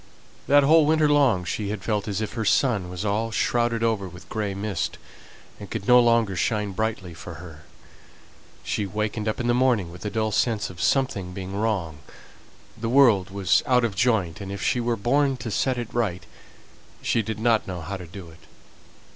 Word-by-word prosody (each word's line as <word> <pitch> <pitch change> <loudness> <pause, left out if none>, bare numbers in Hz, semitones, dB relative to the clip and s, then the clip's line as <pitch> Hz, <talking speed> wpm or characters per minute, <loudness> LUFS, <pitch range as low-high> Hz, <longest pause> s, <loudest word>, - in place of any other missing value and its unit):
That 145 0 +6
whole 155 +1 +5
winter 155 -1 +3
long 135 -11 +3
she 100 +4 -3
had 105 -2 -4
felt 105 -2 -1
as 100 0 -2
if 110 - -4
her 115 - -2
sun 105 -4 +2
was 90 +3 -5
all 105 +3 0
shrouded 115 +1 0
over 110 -4 0
with 90 0 -13
grey 105 -3 -3
mist, 100 -4 -3 0.6
and - - -9
could 100 - -5
no 125 0 +7
longer 115 -4 +3
shine 105 +1 -1
brightly 100 -3 -3
for 85 +1 -9
her. 80 -2 -12 1.0
She 105 - -2
wakened 105 +2 -3
up 110 - -1
in 120 - -2
the 120 - +2
morning 120 -8 +2
with 90 - -11
a 105 - -2
dull 110 +1 -1
sense 110 -2 0
of 90 -1 -9
something 100 -10 0
being 95 +1 -6
wrong; 100 -8 -2 0.8
the 115 0 -4
world 115 -8 +5
was 100 -1 +2
out 125 -1 +3
of 115 -3 0
joint, 100 -7 +1
and, 100 -1 -6
if 100 -1 -5
she 125 - +1
were 120 0 0
born 135 +5 +1
to 115 -2 -6
set 130 +4 0
it 120 -2 -5
right, 95 -8 -1 0.8
she 115 - +1
did 110 0 -4
not 115 0 +1
know 90 -2 -5
how 95 +5 -5
to 90 -3 -8
do 85 -1 -10
it. 80 - -17
105 Hz, 195 wpm, -24 LUFS, 95-120 Hz, 1.0 s, no